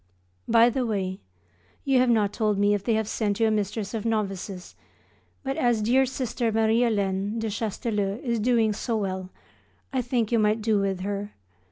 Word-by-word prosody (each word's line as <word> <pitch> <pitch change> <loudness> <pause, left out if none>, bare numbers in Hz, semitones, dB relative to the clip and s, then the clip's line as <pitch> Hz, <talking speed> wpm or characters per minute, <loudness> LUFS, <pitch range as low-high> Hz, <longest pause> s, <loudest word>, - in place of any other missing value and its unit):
By 235 +1 +5
the 260 +2 -1
way, 195 -5 -2 0.7
you 270 -2 +3
have 250 0 +3
not 210 -3 +2
told 210 -2 0
me 205 +1 +3
if 205 -2 -1
they 225 +1 +1
have 220 -1 0
sent 210 -2 -1
you 225 - +4
a - - +2
mistress 210 0 -2
of 220 -2 -3
novices; 195 -4 -3 0.7
but 270 0 -3
as 235 -3 +2
dear 260 +4 +3
Sister 245 -2 -2
Marie 220 +1 +2
Hélène 205 -2 0
(de 225 0 -2
Chastellux) 210 -1 -2
is 235 -3 0
doing 225 -1 +2
so 225 +2 -2
well 190 -2 -3 0.6
I 260 - +1
think 240 -3 -1
you 230 - +3
might 215 +1 +1
do 215 -2 +2
with 195 -2 -1
her. 200 +1 -4
220 Hz, 185 wpm, -26 LUFS, 200-235 Hz, 0.7 s, By